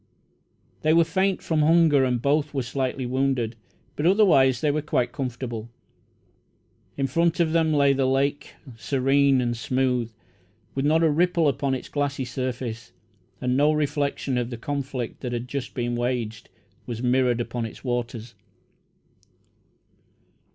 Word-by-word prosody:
They 155 0 +3
were 165 0 +6
faint 190 +4 0
from 160 -2 +1
hunger, 155 -3 +4
and 125 -1 0
both 145 +1 +1
were 135 - 0
slightly 130 +1 -2
wounded, 130 -2 0 0.4
but 150 - 0
otherwise 155 - +4
they 150 - +1
were 155 +1 -1
quite 125 -4 0
comfortable. 120 -5 -5 1.3
In 135 - 0
front 165 +6 +1
of 165 -2 +2
them 165 -1 +2
lay 140 -2 +4
the 135 -1 +1
lake, 140 +2 -1 0.2
serene 135 +2 +2
and 120 -1 -1
smooth, 125 -1 0 0.6
with 135 +1 -1
not 160 +2 +3
a 160 - +4
ripple 170 +1 +2
upon 140 -1 0
its 130 - -7
glassy 140 -2 -2
surface, 125 -2 -5 0.5
and 125 0 0
no 145 +3 +4
reflection 145 -3 -1
of 120 -1 -3
the 120 - -6
conflict 135 -1 -4
that 125 -2 -4
had 120 +1 -3
just 135 0 -5
been 120 -1 -1
waged 120 -2 -3 0.4
was 120 0 -5
mirrored 125 -1 +2
upon 120 0 -3
its - - -13
waters. 120 -2 -3
135 Hz, 145 wpm, -24 LUFS, 125-145 Hz, 1.3 s, were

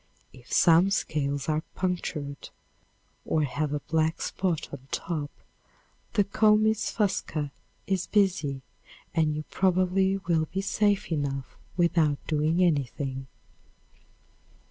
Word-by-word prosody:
If 125 -2 -16
some 175 +2 +5
scales 140 -7 -1
are 155 0 +1
punctured 155 -6 -3 0.7
or 155 - +1
have 145 +2 -1
a 150 -1 -2
black 160 +1 0
spot 180 -5 -1
on 135 -1 -9
top, 155 -4 -3 0.8
the 210 -3 +4
comys 215 +2 +3
fusca 165 -8 -1 0.3
is 190 -2 -1
busy 175 -10 +1 0.5
and 155 -3 +2
you 155 - -3
probably 190 +1 +2
will 165 -4 0
be 195 - -1
safe 205 0 +1
enough 140 -4 -2 0.2
without 165 -4 +3
doing 160 +3 +2
anything. 135 -4 -1
160 Hz, 110 wpm, -27 LUFS, 145-190 Hz, 0.8 s, some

